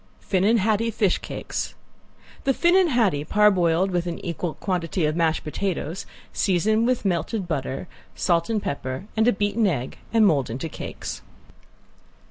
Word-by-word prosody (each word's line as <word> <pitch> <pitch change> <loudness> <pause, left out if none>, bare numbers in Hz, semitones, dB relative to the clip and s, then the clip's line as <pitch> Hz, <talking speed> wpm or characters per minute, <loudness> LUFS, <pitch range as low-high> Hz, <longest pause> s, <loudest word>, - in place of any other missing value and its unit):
~FINNAN 200 +4 +2
HADDIE 220 +2 +2
FISH 205 -4 +1
CAKES~ - - -5 0.7
The 270 -1 +3
finnan 360 +1 +4
haddie 220 - +2
parboiled 190 -2 +3
with 175 -1 0
an 170 - -3
equal 170 -1 -3
quantity 180 -3 -1
of 155 0 0
mashed 165 -2 +1
potatoes, 180 +1 -3 0.3
season 215 +5 +2
with 250 -4 0
melted 190 +2 -1
butter, 140 0 -3 0.3
salt 170 0 +1
and 215 -3 0
pepper, 130 +2 -4
add 220 +1 +3
a - - +6
beaten 205 +1 +1
egg, 135 -8 -2
and 225 -1 +5
mold 145 - +2
into 130 +8 -4
cakes. - - -6
185 Hz, 145 wpm, -24 LUFS, 165-215 Hz, 0.7 s, a